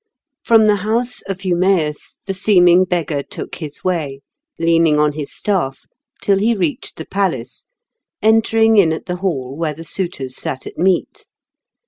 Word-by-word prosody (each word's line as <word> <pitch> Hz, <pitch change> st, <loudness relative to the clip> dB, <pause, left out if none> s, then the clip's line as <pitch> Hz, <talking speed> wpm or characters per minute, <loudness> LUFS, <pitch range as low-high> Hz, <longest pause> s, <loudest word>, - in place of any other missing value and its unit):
From 225 Hz, -2 st, +5 dB
the 210 Hz, -1 st, +4 dB
house 230 Hz, +5 st, -1 dB
of 195 Hz, 0 st, -5 dB
Eumaeus 175 Hz, -4 st, 0 dB
the 195 Hz, -, -2 dB
seeming 185 Hz, -2 st, +4 dB
beggar 165 Hz, -5 st, -1 dB
took -, -, -7 dB
his 150 Hz, -4 st, -8 dB
way, 155 Hz, -7 st, -2 dB, 0.4 s
leaning 165 Hz, -2 st, +3 dB
on 150 Hz, 0 st, +3 dB
his 145 Hz, -1 st, -5 dB
staff, 175 Hz, -10 st, -1 dB, 0.4 s
till 195 Hz, -1 st, +3 dB
he 225 Hz, +3 st, +2 dB
reached 175 Hz, -7 st, -2 dB
the 160 Hz, -, -8 dB
palace, 165 Hz, -11 st, -3 dB, 0.5 s
entering 225 Hz, 0 st, +3 dB
in 175 Hz, -6 st, +5 dB
at 160 Hz, -, -6 dB
the 180 Hz, 0 st, -3 dB
hall 140 Hz, -9 st, -3 dB
where 155 Hz, -1 st, -2 dB
the 165 Hz, -, -9 dB
suitors 165 Hz, -8 st, -4 dB
sat 130 Hz, -, -4 dB
at -, -, -8 dB
meat. 185 Hz, 0 st, 0 dB
180 Hz, 155 wpm, -18 LUFS, 150-195 Hz, 0.5 s, From